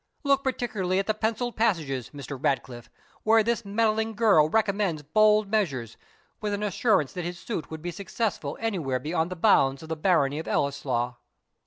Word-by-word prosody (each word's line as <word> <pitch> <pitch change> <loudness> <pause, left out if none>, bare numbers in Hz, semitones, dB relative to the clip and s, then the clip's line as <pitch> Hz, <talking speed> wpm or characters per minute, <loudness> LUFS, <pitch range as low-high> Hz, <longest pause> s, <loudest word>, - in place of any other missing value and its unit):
Look 275 -1 +2
particularly 215 -8 -1
at 195 - +1
the 215 - +1
pencilled 225 +3 -2
passages, 160 - 0
Mr. 145 -1 -7
Ratcliffe, 120 -3 -2 0.3
where 220 0 +4
this 235 +1 0
meddling 220 +1 0
girl 200 -9 +4
recommends 200 -6 0
bold 215 +6 +4
measures, 135 - -1 0.5
with 210 -1 -1
an 205 - -4
assurance 205 - +1
that 180 - -4
his 175 +1 -5
suit 190 -4 -5
would 160 0 -8
be 175 - -3
successful 195 -5 -3
anywhere 175 -13 -1
beyond 160 +5 -1
the 185 - -5
bounds 140 -7 +3
of 160 - -11
the 160 - -1
barony 155 -4 +2
of 160 - -7
Ellieslaw." 125 -4 -1
185 Hz, 170 wpm, -26 LUFS, 145-215 Hz, 0.5 s, where